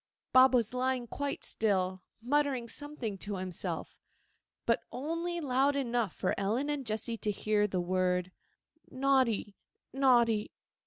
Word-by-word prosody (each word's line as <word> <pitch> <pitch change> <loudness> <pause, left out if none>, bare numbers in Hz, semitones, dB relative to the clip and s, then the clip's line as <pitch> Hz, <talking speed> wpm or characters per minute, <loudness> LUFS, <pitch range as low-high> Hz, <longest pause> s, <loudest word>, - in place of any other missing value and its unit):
Bob 260 0 +7
was 235 -1 +1
lying 255 -1 0
quite 280 +4 -4
still, 185 -3 0 0.2
muttering 270 -2 +1
something 250 -7 -5
to 205 +1 -4
himself, 185 -2 -5 0.7
but - - +2
only 335 +6 -3
loud 275 -1 +2
enough 240 -7 0
for 185 - 0
Ellen 230 +9 0
and 280 -4 -3
Jessy 220 +2 -2
to 215 - -3
hear 210 0 +1
the 185 -2 -2
word 180 0 0 0.6
'Naughty, 260 -6 +1 0.4
naughty. 240 -5 +3
240 Hz, 125 wpm, -31 LUFS, 205-270 Hz, 0.7 s, Bob